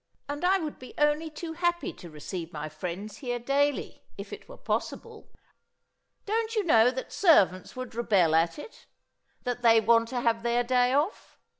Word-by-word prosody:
And 290 +3 -5
I 375 +2 +4
would 315 -5 -5
be 255 - -12
only 295 +2 +2
too 320 +1 -7
happy 345 +1 -1
to 175 - -12
receive 165 +2 -7
my 155 -1 -5
friends 180 +7 -6
here 245 -2 -3
daily, 275 +4 -1
if - - -8
it - - -10
were - - -11
possible. 455 -2 -4 1.0
Don't 450 +2 -1
you 425 - +1
know 240 - +5
that 260 +1 -6
servants 195 - +3
would 255 -1 -6
rebel 200 -8 +2
at 165 +1 +2
it? 295 - -12 0.6
That 245 0 -3
they 230 -1 +6
want 230 +1 +3
to 245 +1 -3
have 230 -1 +1
their 240 +1 +1
day 250 0 +2
off? 295 +9 -1
245 Hz, 175 wpm, -28 LUFS, 220-310 Hz, 1.0 s, they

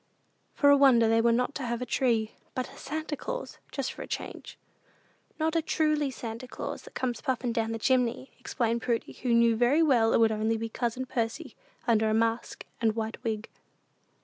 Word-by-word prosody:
For 285 -1 +5
a 285 - +7
wonder 255 -5 +6
they 225 0 +4
were 235 0 +4
not 250 +4 +1
to - - -5
have 235 -1 -2
a 250 - -3
Tree, 230 -3 +1 0.2
but 255 -1 -3
a - - -14
Santa 310 +1 -4
Claus, - - -6
"just 275 -2 -3
for - - -9
a - - -6
change." - - -6 0.8
"Not 320 +1 0
a 330 - +3
truly 305 -2 +1
Santa 235 -1 -6
Claus, - - -6
that - - -15
comes 245 -2 -2
puffin' 255 -3 -1
down 225 -1 0
the 225 - -2
chimney," 250 +1 +1
explained 235 -1 -1
Prudy, 235 -1 -1
who 250 - -3
knew 235 -1 +5
very 250 +8 +4
well 240 -7 +4
it - - +4
would 225 -1 +5
be - - -1
only 225 +1 -1
cousin 240 +3 -2
Percy 230 -3 -3 0.3
under 220 -2 +3
a 215 - +2
mask 230 +1 -1 0.2
and 220 -2 +2
white 225 0 -4
wig. 220 -1 -2
235 Hz, 200 wpm, -28 LUFS, 225-265 Hz, 0.8 s, a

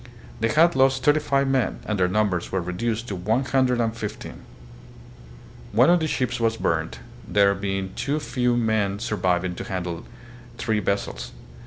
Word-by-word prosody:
They 115 - +2
had 165 +7 +4
lost 135 0 +3
thirty 150 +1 +4
five 140 -2 +1
men 135 -2 +1
and 105 -2 -2
their 90 - +3
numbers 95 -2 0
were 95 - 0
reduced 110 +6 -3
to 100 - -3
one 110 +9 0
hundred 130 -2 +2
and 115 -1 0
fifteen. 110 -2 -7 1.3
One 125 +9 +5
of 175 - +5
the 160 - -1
ships 125 -4 -1
was 115 -1 +1
burned, - - -1 0.3
there 100 -1 +4
being 95 -1 -3
too 145 +2 -1
few 125 -4 0
men 110 -4 +1
surviving 95 -5 0
to - - -6
handle 90 -3 -4 0.5
three 110 -2 0
vessels. 100 0 -3
110 Hz, 165 wpm, -24 LUFS, 95-130 Hz, 1.3 s, One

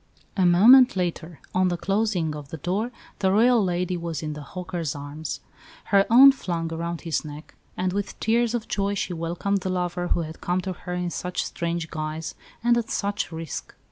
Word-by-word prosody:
A 185 -3 +3
moment 240 +8 +7
later, 175 -3 -3
on 185 0 +3
the 175 -1 0
closing 195 -5 0
of 145 -2 -9
the 160 - -6
door, 190 - -1 0.3
the 190 - +2
Royal 230 +2 +5
lady 180 0 -1
was 170 -3 -4
in 155 -1 -3
the 150 - -7
"hawker's" 170 -2 -4
arms, 145 +2 -6 0.5
her 195 0 +5
own 260 +4 +9
flung 170 -10 -3
around 170 +1 -4
his 165 -2 -1
neck, 150 0 -10 0.2
as 185 0 0
with 205 0 -3
tears 235 +1 +2
of 230 - -3
joy 200 0 -1
she 185 - -2
welcomed 175 +4 -1
the 185 - -3
lover 180 -1 -1
who 175 - +1
had 160 0 -7
come 180 +1 0
to 185 0 -4
her 180 0 -6
in 180 -1 -2
such 180 +2 -3
strange 170 -1 -3
guise 155 0 -4 0.3
and 240 0 +4
at 230 - -5
such 205 0 -2
risk. 160 -1 -6
180 Hz, 195 wpm, -25 LUFS, 165-200 Hz, 0.5 s, own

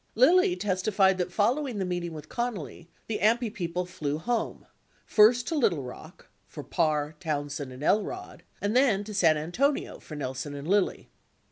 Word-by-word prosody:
Lilly 360 - +5
testified 195 - +2
that 180 0 -1
following 245 +5 0
the 190 - -1
meeting 175 -1 -3
with 155 -1 -9
Connally, 205 - -4 0.2
the 225 - -3
AMPI 225 +1 +2
people 180 -3 -3
flew 150 -4 -3
home 230 +7 -2 0.2
— - - -36
first 235 +3 +5
to 330 - -1
Little 185 - +2
Rock 125 - -11 0.2
(for - - -9
Parr, 155 -2 0
Townsend, 145 -4 -3
and 130 +3 -9
Elrod) 215 - -1 0.2
and 205 +3 -1
then 245 -7 +4
to 210 +1 -8
San 165 -6 +4
Antonio 230 - -1
(for 155 - -10
Nelson 135 0 -4
and 140 +2 -7
Lilly). 200 +1 0
190 Hz, 165 wpm, -28 LUFS, 155-230 Hz, 0.2 s, Lilly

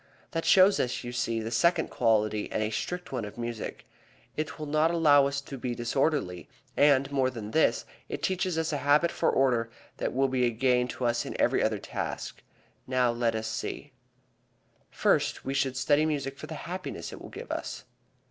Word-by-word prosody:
That 165 -2 -2
shows 195 +1 +6
us, 125 0 -1
you 120 - -5
see, 115 -2 -1
the 110 +1 -4
second 170 +10 +2
quality 110 -1 +1
and 110 - 0
a 110 - -2
strict 180 +11 -4
one 125 -4 -2
of 105 +2 -8
music. 120 -2 -5 0.5
It 155 0 -3
will 155 - -5
not 155 +2 +2
allow 150 -5 +5
us 140 0 -2
to 140 -1 -8
be 120 -1 -3
disorderly, 120 - -1 0.3
and 140 -1 +4
more 135 -2 +2
than 110 -4 -7
this, 120 -6 +2 0.2
it - - -5
teaches 185 -2 0
us 160 -1 -1
a - - +1
habit 145 +5 +3
for - - +1
order 120 -4 +2 0.3
that - - -2
will 135 +2 +2
be 130 -1 0
a - - +2
gain 125 +1 +2
to 125 - -4
us 120 0 +1
in - - -6
every - - +3
other - - +1
task. - - -5 0.5
Now 125 -2 +2
let 120 -1 0
us 110 0 -3
see: 115 +5 -5 1.0
First, - - +1
we 135 - -2
should 135 -1 0
study 145 +4 +3
music 140 -3 -2
for - - -7
the 160 - -6
happiness 180 - -5
it - - -10
will - - -9
give - - -8
us. - - -4
130 Hz, 195 wpm, -28 LUFS, 120-150 Hz, 1.0 s, shows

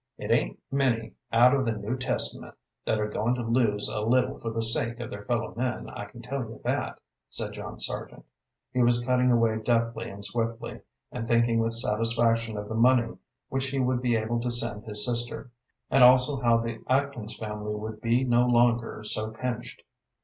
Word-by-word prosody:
"It - - -4
ain't - - +1
many 125 -5 0 0.2
out 120 +3 +6
of 135 -1 +2
the 115 -3 0
New 105 +3 -3
Testament 125 -1 -1 0.3
that 110 - +1
are 105 - 0
going 110 +3 0
to 120 - -3
lose 115 -3 +1
a - - -3
little 125 +4 +1
for 115 - -4
the 115 0 -2
sake 115 +1 0
of 120 - -6
their 100 0 -7
fellow 120 -2 -1
men, 125 +1 -3
I 100 - -6
can 115 +3 -13
tell 135 +4 -3
you 115 -3 -6
that," - - -1 0.3
said - - -4
John - - -8
Sargent. - - -4 0.5
He 125 - +2
was 120 0 +3
cutting 125 0 +3
away 115 -2 +2
deftly 115 0 0
and 100 +1 -5
swiftly, 115 +2 -3 0.3
and 115 -2 -5
thinking 115 0 +3
with 115 0 +1
satisfaction 115 0 +2
of 105 0 -5
the 110 - -5
money 120 0 +3 0.3
which 135 0 -1
he 135 +1 -3
would 130 -1 +1
be 120 -2 +2
able 115 +2 0
to 120 +1 -2
send 115 -3 -1
his 105 -1 0
sister, 120 +1 -2 0.4
and 135 0 +6
also 130 +2 +6
how 120 -1 +4
the 115 -1 -3
Atkins 130 -4 0
family 105 -1 -4
would 110 0 -6
be 120 +3 +2
no 120 -1 +3
longer 120 -2 +2
so 110 0 -2
pinched. 120 +1 -5
115 Hz, 195 wpm, -27 LUFS, 110-125 Hz, 0.5 s, out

